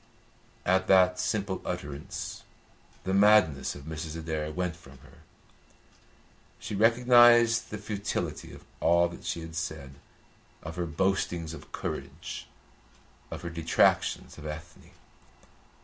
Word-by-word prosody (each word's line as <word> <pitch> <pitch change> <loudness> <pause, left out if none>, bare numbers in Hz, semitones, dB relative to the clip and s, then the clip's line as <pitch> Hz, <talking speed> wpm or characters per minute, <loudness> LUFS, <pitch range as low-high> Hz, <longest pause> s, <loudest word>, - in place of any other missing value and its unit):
At 95 0 +2
that 90 -1 +5
simple 100 -4 -1
utterance 75 -5 -5 0.6
the 95 - -2
madness 100 -7 +4
of 70 - -10
Mrs. 80 +1 -6
Adair 80 -1 -3
went 90 0 -2
from 70 -5 -16
her. - - -19 1.4
She - - -7
recognised 120 +1 +5
the 105 - -5
futility 105 -1 -4
of - - -13
all 85 0 +4
that 85 - -11
she 85 - -3
had 80 0 -9
said, 80 -4 -5 0.7
of 80 +1 -7
her 90 0 -2
boastings 85 -1 -1
of - - -11
courage, - - -6 0.8
of - - -7
her 85 - -5
detractions 80 -1 +1
of 75 - -7
Ethne. 80 +3 -9
85 Hz, 120 wpm, -28 LUFS, 80-100 Hz, 1.4 s, that